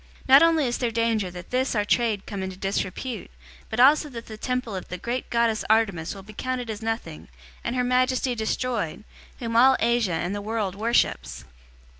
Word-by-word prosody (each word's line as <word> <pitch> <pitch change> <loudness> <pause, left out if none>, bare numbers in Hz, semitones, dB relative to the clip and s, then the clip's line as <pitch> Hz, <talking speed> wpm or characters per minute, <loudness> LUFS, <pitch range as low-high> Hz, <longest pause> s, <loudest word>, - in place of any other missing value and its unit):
019:027 - - -17
Not 270 +2 +9
only 330 -3 +4
is 240 -1 -1
there 245 - 0
danger 225 -4 0
that 180 0 -10
this 255 0 0
our 210 -1 +1
trade 220 -2 +1
come 200 -2 -5
into 190 -1 -5
disrepute, 195 +5 -3 0.4
but 220 - -3
also 295 +4 +6
that 235 -3 -8
the 220 - -8
temple 250 -1 -3
of 185 - -6
the 180 - -5
great 240 +7 -4
goddess 235 -2 +1
Artemis 195 -6 +1
will 195 - -10
be 215 +2 -12
counted 250 0 -3
as 215 0 -7
nothing, 225 -8 -4 0.4
and 235 - -2
her 250 - +1
majesty 255 0 +1
destroyed, 220 -5 -2 0.3
whom 230 -2 -4
all 260 +3 +6
Asia 235 -6 +2
and 175 +4 -2
the 205 - -3
world 210 -2 -2
worships." 220 - 0
230 Hz, 195 wpm, -25 LUFS, 200-250 Hz, 0.4 s, Not